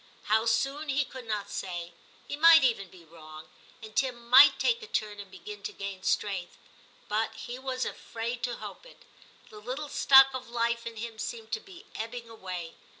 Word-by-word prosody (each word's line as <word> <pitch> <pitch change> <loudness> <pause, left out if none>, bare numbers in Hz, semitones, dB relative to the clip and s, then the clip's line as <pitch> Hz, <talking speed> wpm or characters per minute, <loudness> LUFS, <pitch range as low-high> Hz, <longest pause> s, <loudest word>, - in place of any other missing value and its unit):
How 220 +2 +2
soon 275 +7 0
he 280 +1 +1
could 255 -2 -10
not 210 -2 -3
say; 175 -2 -5 0.3
he - - -3
might 325 0 +8
even 225 -7 +1
be 175 -2 -16
wrong, 155 -1 -12 0.4
and 215 0 -10
Tim 245 -2 -1
might 270 +3 +9
take 470 -1 +1
a 445 - -9
turn 210 - -2
and 200 -1 -9
begin 420 - -10
to 420 - -5
gain 200 - -6
strength; 190 -2 -1 0.5
but 220 +1 -1
he 240 +3 -7
was 260 -1 -2
afraid 235 +1 -5
to 240 -1 -3
hope - - -9
it. - - -17 0.5
The 210 - -11
little 260 +7 -5
stock 270 -1 +7
of 255 -2 -6
life 235 0 -1
in 230 - -7
him 225 0 -7
seemed 225 -1 -6
to - - -1
be 385 -4 -14
ebbing 230 +1 -6
away. 185 -6 -6
235 Hz, 190 wpm, -29 LUFS, 210-270 Hz, 0.5 s, might